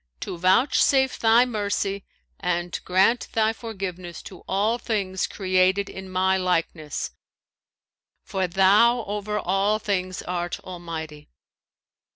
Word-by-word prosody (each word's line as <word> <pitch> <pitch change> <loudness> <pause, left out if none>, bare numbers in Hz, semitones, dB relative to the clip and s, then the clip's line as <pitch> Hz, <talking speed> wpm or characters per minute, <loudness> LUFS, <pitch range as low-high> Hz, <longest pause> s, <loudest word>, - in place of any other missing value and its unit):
to - - -5
vouchsafe 260 +8 +3
Thy 230 +2 +5
mercy 200 -3 -2 0.4
and 175 -2 -2
grant 190 +6 +3
Thy 220 0 +2
forgiveness 185 -7 -6
to 185 - -11
all 210 +5 +1
things 195 -6 -1
created 185 +1 +1
in 190 0 -8
my 190 +1 +2
likeness; 165 -4 -2 1.1
for 190 -2 -2
Thou 205 +6 +4
over 210 +1 -3
all 195 +2 +1
things 185 -4 -2
art 175 -1 -3
Almighty!' 165 -4 -7
190 Hz, 110 wpm, -24 LUFS, 180-210 Hz, 1.1 s, Thy